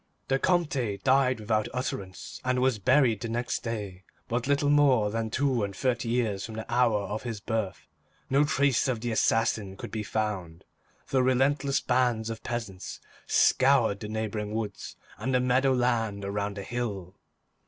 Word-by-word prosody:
The 135 Hz, 0 st, +2 dB
Comte 140 Hz, -, +1 dB
died 130 Hz, -2 st, +3 dB
without 110 Hz, 0 st, 0 dB
utterance, 100 Hz, -7 st, -5 dB
and 125 Hz, 0 st, +1 dB
was 130 Hz, -3 st, +2 dB
buried 115 Hz, 0 st, +3 dB
the 115 Hz, -, -3 dB
next 120 Hz, +2 st, -1 dB
day, 105 Hz, -5 st, -5 dB, 0.2 s
but 125 Hz, 0 st, -2 dB
little 145 Hz, 0 st, +2 dB
more 130 Hz, -8 st, +4 dB
than 115 Hz, 0 st, -2 dB
two 130 Hz, -1 st, +1 dB
and 100 Hz, -1 st, -4 dB
thirty 120 Hz, +3 st, -1 dB
years 110 Hz, -5 st, 0 dB
from 110 Hz, -, -7 dB
the 110 Hz, 0 st, -5 dB
hour 120 Hz, -4 st, +3 dB
of 105 Hz, +2 st, -4 dB
his 115 Hz, -4 st, -5 dB
birth. 110 Hz, -3 st, -3 dB, 0.4 s
No 140 Hz, +2 st, +3 dB
trace 140 Hz, -3 st, +2 dB
of 120 Hz, -4 st, -1 dB
the 120 Hz, 0 st, -2 dB
assassin 110 Hz, -3 st, +1 dB
could -, -, -7 dB
be 110 Hz, -, -3 dB
found, 95 Hz, -5 st, -3 dB, 0.4 s
though 135 Hz, -, +2 dB
relentless 135 Hz, +2 st, +2 dB
bands 120 Hz, -3 st, +1 dB
of 110 Hz, -, -7 dB
peasants 115 Hz, -6 st, -5 dB, 0.3 s
scoured 130 Hz, -6 st, +4 dB
the 105 Hz, -, -6 dB
neighboring 110 Hz, -1 st, -3 dB
woods 105 Hz, -3 st, -5 dB, 0.2 s
and 130 Hz, 0 st, -1 dB
the -, -, +4 dB
meadow 125 Hz, +2 st, +3 dB
land 115 Hz, -5 st, 0 dB
around 100 Hz, 0 st, -3 dB
the 100 Hz, -, -4 dB
hill. 100 Hz, -6 st, -4 dB
115 Hz, 165 wpm, -28 LUFS, 105-130 Hz, 0.4 s, more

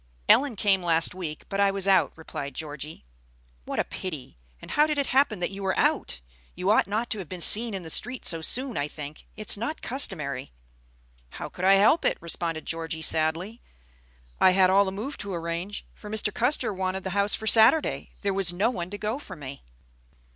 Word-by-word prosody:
"Ellen 275 Hz, -3 st, +4 dB
came 195 Hz, -2 st, +1 dB
last 165 Hz, -1 st, +2 dB
week, 165 Hz, -5 st, -7 dB
but 195 Hz, -, -4 dB
I 200 Hz, 0 st, +4 dB
was 195 Hz, 0 st, -2 dB
out," 195 Hz, -1 st, +3 dB
replied 140 Hz, -4 st, -8 dB
Georgie. 150 Hz, -, -7 dB, 0.6 s
"What -, -, -5 dB
a -, -, +2 dB
pity! 155 Hz, -, -8 dB, 0.2 s
And -, -, -11 dB
how 300 Hz, +1 st, +3 dB
did 300 Hz, -1 st, -2 dB
it 280 Hz, -, 0 dB
happen 260 Hz, -6 st, +1 dB
that 175 Hz, -, -1 dB
you 200 Hz, 0 st, -8 dB
were 190 Hz, -1 st, -1 dB
out? -, -, 0 dB, 0.3 s
You 180 Hz, +3 st, 0 dB
ought 220 Hz, -, +3 dB
not 220 Hz, +4 st, -3 dB
to 215 Hz, -, -2 dB
have 180 Hz, -, -8 dB
been 185 Hz, -, -6 dB
seen 220 Hz, +5 st, +7 dB
in 190 Hz, -, -6 dB
the 160 Hz, -, -8 dB
street 245 Hz, +7 st, -1 dB
so 165 Hz, -2 st, +1 dB
soon, 255 Hz, +9 st, -1 dB
I 145 Hz, -, -1 dB
think. 150 Hz, 0 st, -10 dB
It's 215 Hz, -1 st, +6 dB
not 235 Hz, +9 st, -5 dB
customary." 150 Hz, -, 0 dB, 0.8 s
"How -, -, -8 dB
could 185 Hz, -, -5 dB
I 195 Hz, -, +6 dB
help 210 Hz, +12 st, +4 dB
it?" -, -, +1 dB
responded 165 Hz, -1 st, -2 dB
Georgie, 160 Hz, -1 st, -4 dB
sadly. 165 Hz, +8 st, +1 dB, 0.8 s
"I 185 Hz, -, +5 dB
had 185 Hz, -1 st, +4 dB
all 200 Hz, +1 st, +4 dB
the 190 Hz, -, -3 dB
move 220 Hz, +9 st, -6 dB
to 200 Hz, -3 st, -5 dB
arrange 170 Hz, +4 st, -5 dB
for. 210 Hz, -, -12 dB
Mr. 210 Hz, -1 st, -2 dB
Custer 245 Hz, -3 st, 0 dB
wanted 190 Hz, 0 st, -3 dB
the 190 Hz, -, -4 dB
house 200 Hz, +2 st, +1 dB
for 220 Hz, -, -8 dB
Saturday. 230 Hz, +8 st, +4 dB
There 200 Hz, -1 st, -1 dB
was 190 Hz, -2 st, 0 dB
no 200 Hz, +7 st, 0 dB
one 180 Hz, -7 st, -5 dB
to 205 Hz, -, -7 dB
go 215 Hz, +6 st, -3 dB
for -, -, -10 dB
me." 140 Hz, -3 st, -9 dB
190 Hz, 205 wpm, -25 LUFS, 165-215 Hz, 0.8 s, seen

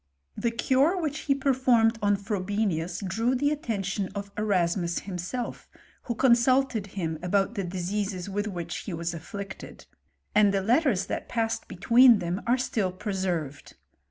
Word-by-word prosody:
The 235 Hz, -, 0 dB
cure 270 Hz, +9 st, +2 dB
which 305 Hz, -3 st, -2 dB
he 275 Hz, -, +5 dB
performed 250 Hz, -4 st, +3 dB
on 205 Hz, 0 st, +3 dB
Frobenius, 195 Hz, -3 st, -2 dB
drew 230 Hz, +7 st, 0 dB
the 285 Hz, +3 st, +1 dB
attention 200 Hz, -8 st, -2 dB
of 200 Hz, 0 st, -5 dB
Erasmus 180 Hz, -4 st, 0 dB
himself^ 195 Hz, +6 st, -5 dB, 0.4 s
who 235 Hz, -, -2 dB
consulted 245 Hz, -2 st, +3 dB
him 160 Hz, -4 st, -2 dB
about 195 Hz, +4 st, +1 dB
the 200 Hz, -4 st, -2 dB
diseases 185 Hz, +1 st, -3 dB
with 205 Hz, +2 st, -2 dB
which 175 Hz, -4 st, -5 dB
hc^ 175 Hz, -5 st, -3 dB
was 170 Hz, +1 st, -3 dB
afflicted; 195 Hz, +4 st, -8 dB, 0.5 s
and 205 Hz, -1 st, +5 dB
the 195 Hz, -1 st, +1 dB
letters 235 Hz, -, +2 dB
that -, -, -5 dB
passed 225 Hz, -1 st, -1 dB
betweem 235 Hz, +5 st, +6 dB
them 175 Hz, 0 st, -3 dB
are 245 Hz, +2 st, +4 dB
still 215 Hz, -6 st, -1 dB
preserved. 180 Hz, -7 st, -3 dB
205 Hz, 145 wpm, -27 LUFS, 185-235 Hz, 0.5 s, betweem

